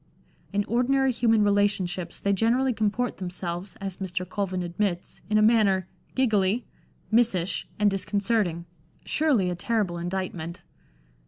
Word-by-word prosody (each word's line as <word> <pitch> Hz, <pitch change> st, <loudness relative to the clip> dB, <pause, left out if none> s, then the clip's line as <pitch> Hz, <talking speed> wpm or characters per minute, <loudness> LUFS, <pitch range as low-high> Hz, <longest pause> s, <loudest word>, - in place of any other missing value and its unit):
In 205 Hz, 0 st, 0 dB
ordinary 260 Hz, +3 st, +2 dB
human 225 Hz, -3 st, +3 dB
relationships 200 Hz, -4 st, 0 dB
they 200 Hz, -, +1 dB
generally 245 Hz, +6 st, +2 dB
comport 220 Hz, +3 st, -1 dB
themselves, 180 Hz, 0 st, -4 dB
as 195 Hz, -2 st, -5 dB
Mr, 185 Hz, -1 st, -3 dB
Colvin 185 Hz, -1 st, -2 dB
admits, 175 Hz, +1 st, -3 dB
in 215 Hz, -, +3 dB
a 215 Hz, -, +5 dB
manner 205 Hz, -5 st, +4 dB
" -, -, -34 dB
giggly, 220 Hz, -3 st, +2 dB, 0.5 s
missish, 210 Hz, -6 st, +2 dB
and 210 Hz, -1 st, +3 dB
disconcerting 195 Hz, -3 st, 0 dB
" 155 Hz, -, -33 dB
— -, -, -34 dB
surely 260 Hz, -, +2 dB
a -, -, -2 dB
terrible 190 Hz, -2 st, -1 dB
indictment. 175 Hz, -1 st, -4 dB
200 Hz, 140 wpm, -26 LUFS, 180-225 Hz, 0.5 s, a